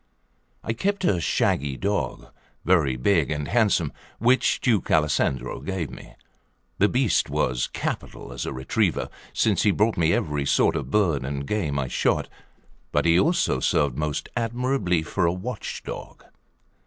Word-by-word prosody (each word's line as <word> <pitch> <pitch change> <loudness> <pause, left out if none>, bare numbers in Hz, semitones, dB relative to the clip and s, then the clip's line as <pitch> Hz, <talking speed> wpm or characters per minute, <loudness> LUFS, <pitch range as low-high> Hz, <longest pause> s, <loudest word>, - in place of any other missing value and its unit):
I 115 - -1
kept 195 - -1
a 90 - +2
shaggy 70 -3 0
dog, 100 +1 -2 0.3
very 80 -8 +3
big 80 +2 +2
and 75 -2 -2
handsome, 105 -9 +2 0.2
which 125 +4 +3
Duke 115 -7 +1
Alessandro 75 -5 +1
gave 90 -8 -3
me; - - -12 0.6
the 105 - +4
beast 125 -3 +2
was 60 -1 0
capital - - -5
as - - -4
a - - -2
retriever, 65 0 0 0.2
since 105 -6 +2
he 105 - +3
brought 105 +3 +2
me 85 -1 +3
every 75 -4 0
sort - - +3
of - - -3
birds 85 -10 +2
and 70 +1 -3
game 80 -7 -1
I 70 -2 -1
shot, - - 0 0.6
but - - +1
he 85 +1 +5
also 170 - +2
served 70 -4 +1
most 75 0 -2
admirably 120 -7 0
for 85 +2 0
a - - +3
watchdog. 105 +5 -6
85 Hz, 150 wpm, -25 LUFS, 70-105 Hz, 0.6 s, he